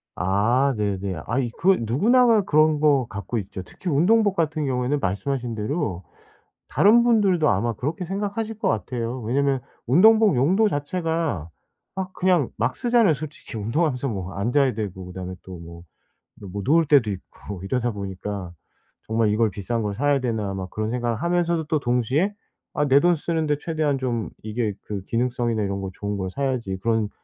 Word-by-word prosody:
아 115 Hz, +8 st, +2 dB
네네. 100 Hz, -5 st, -2 dB
아이 120 Hz, +1 st, -1 dB
그건 185 Hz, -10 st, +3 dB
누구나가 225 Hz, -, +4 dB
그런 155 Hz, -2 st, +3 dB
거 140 Hz, -5 st, +3 dB
갖고 110 Hz, +3 st, -4 dB
있죠. 95 Hz, -1 st, -7 dB
특히 180 Hz, -, -7 dB
운동복 200 Hz, +7 st, +3 dB
같은 155 Hz, -2 st, 0 dB
경우에는 130 Hz, +2 st, 0 dB
말씀하신 120 Hz, +5 st, -2 dB
대로 105 Hz, -, -2 dB, 0.7 s
다른 235 Hz, +4 st, +5 dB
분들도 195 Hz, -9 st, +3 dB
아마 115 Hz, +4 st, +1 dB
그렇게 155 Hz, -, -3 dB
생각하실 205 Hz, +4 st, -3 dB
것 220 Hz, -, 0 dB
같아요. 120 Hz, +2 st, -2 dB
왜냐하면 135 Hz, +3 st, +1 dB, 0.3 s
운동복 215 Hz, -, +6 dB
용도 185 Hz, -, +3 dB
자체가 160 Hz, -, -2 dB, 0.5 s
막 190 Hz, -1 st, -4 dB
그냥 180 Hz, -7 st, +2 dB
막 120 Hz, +4 st, -1 dB
쓰잖아요 235 Hz, -9 st, +3 dB
솔직히 155 Hz, -5 st, -8 dB
운동하면서 130 Hz, +4 st, 0 dB
뭐 95 Hz, -3 st, -4 dB
앉아야 125 Hz, +5 st, +1 dB
되고 95 Hz, -4 st, -5 dB
그다음에 90 Hz, 0 st, -6 dB
또 95 Hz, -2 st, -9 dB
뭐, 85 Hz, 0 st, -11 dB, 0.7 s
뭐 100 Hz, +1 st, -4 dB
누울 160 Hz, +4 st, +4 dB
때도 135 Hz, -7 st, +4 dB
있고 95 Hz, 0 st, -8 dB
이러다 120 Hz, +3 st, -1 dB
보니까 100 Hz, -2 st, -6 dB, 0.5 s
'정말 110 Hz, -1 st, +2 dB
이걸 110 Hz, +1 st, +2 dB
비싼 105 Hz, +5 st, -3 dB
걸 105 Hz, -1 st, -2 dB
사야 145 Hz, +2 st, +2 dB
되나.' 110 Hz, -5 st, -2 dB
막 95 Hz, -1 st, -5 dB
그런 110 Hz, 0 st, -3 dB
생각을 120 Hz, -2 st, -1 dB
하면서도 170 Hz, -2 st, +1 dB
또 150 Hz, 0 st, 0 dB
동시에 130 Hz, -, +1 dB, 0.4 s
'아 145 Hz, -, +1 dB
내 140 Hz, +1 st, +6 dB
돈 175 Hz, -1 st, +4 dB
쓰는데 155 Hz, -2 st, -1 dB
최대한 155 Hz, -4 st, -1 dB
좀 120 Hz, -4 st, -2 dB
이게 110 Hz, -1 st, -2 dB
그 100 Hz, -2 st, -5 dB
기능성이나 120 Hz, -2 st, 0 dB
이런 100 Hz, 0 st, -2 dB
거 95 Hz, -, -4 dB
좋은 100 Hz, 0 st, -3 dB
걸 95 Hz, -1 st, -3 dB
사야지.' 125 Hz, -6 st, -2 dB
그런 110 Hz, -2 st, +1 dB
125 Hz, 355 characters per minute, -23 LUFS, 105-160 Hz, 0.7 s, 운동복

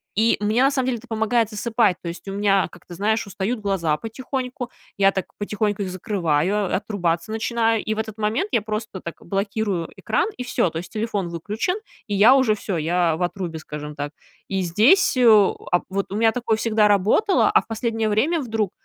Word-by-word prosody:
И 225 Hz, +3 st, +3 dB
мне, 215 Hz, +4 st, +2 dB
на 270 Hz, -, +5 dB
самом 260 Hz, -2 st, 0 dB
деле, 250 Hz, -, 0 dB
это 245 Hz, -, -16 dB
помогает 225 Hz, 0 st, +1 dB
засыпать. 220 Hz, -3 st, +1 dB
То -, -, -7 dB
есть 170 Hz, -, -9 dB
у 195 Hz, -, -4 dB
меня, 195 Hz, -1 st, +2 dB
как 175 Hz, -, -16 dB
ты 175 Hz, -, -10 dB
знаешь, 220 Hz, +4 st, 0 dB
устают 200 Hz, +4 st, -2 dB
глаза 175 Hz, -7 st, 0 dB
потихоньку, 250 Hz, -, -5 dB, 0.3 s
я 195 Hz, 0 st, +5 dB
так 190 Hz, -2 st, -2 dB
потихоньку 205 Hz, 0 st, -1 dB
их 185 Hz, -, -4 dB
закрываю, 185 Hz, +1 st, 0 dB
отрубаться 180 Hz, -2 st, -1 dB
начинаю, 225 Hz, 0 st, 0 dB
и 220 Hz, -, -1 dB
в -, -, -4 dB
этот 220 Hz, -1 st, -4 dB
момент 220 Hz, -, 0 dB
я 230 Hz, -, +2 dB
просто 215 Hz, -1 st, -4 dB
так 170 Hz, -, -6 dB
блокирую 195 Hz, -2 st, -2 dB
экран, -, -, 0 dB
и 250 Hz, -, -4 dB
всё. 240 Hz, -7 st, +1 dB
То 165 Hz, 0 st, -4 dB
есть 180 Hz, -, -9 dB
телефон 210 Hz, -5 st, -2 dB
выключен, 210 Hz, -, -2 dB, 0.3 s
и 205 Hz, -, -3 dB
я 225 Hz, +7 st, +7 dB
уже 260 Hz, -5 st, +4 dB
всё, 200 Hz, -3 st, -3 dB
я 165 Hz, +1 st, +1 dB
в 180 Hz, -, -1 dB
отрубе, 175 Hz, -2 st, -3 dB
скажем 150 Hz, -1 st, -7 dB
так. 145 Hz, 0 st, -4 dB, 0.4 s
И 195 Hz, -1 st, 0 dB
здесь, 230 Hz, -, +4 dB
э, 250 Hz, -, +3 dB
а 205 Hz, -5 st, +4 dB
вот, 195 Hz, +1 st, -3 dB
у 200 Hz, -, -3 dB
меня 225 Hz, 0 st, +4 dB
такое 230 Hz, -2 st, 0 dB
всегда 220 Hz, -2 st, +3 dB
работало, 210 Hz, -, +3 dB
а 430 Hz, 0 st, +4 dB
в -, -, -24 dB
последнее 225 Hz, -1 st, -1 dB
время 280 Hz, +11 st, +2 dB
вдруг 220 Hz, -6 st, -1 dB
210 Hz, 205 wpm, -22 LUFS, 185-225 Hz, 0.4 s, я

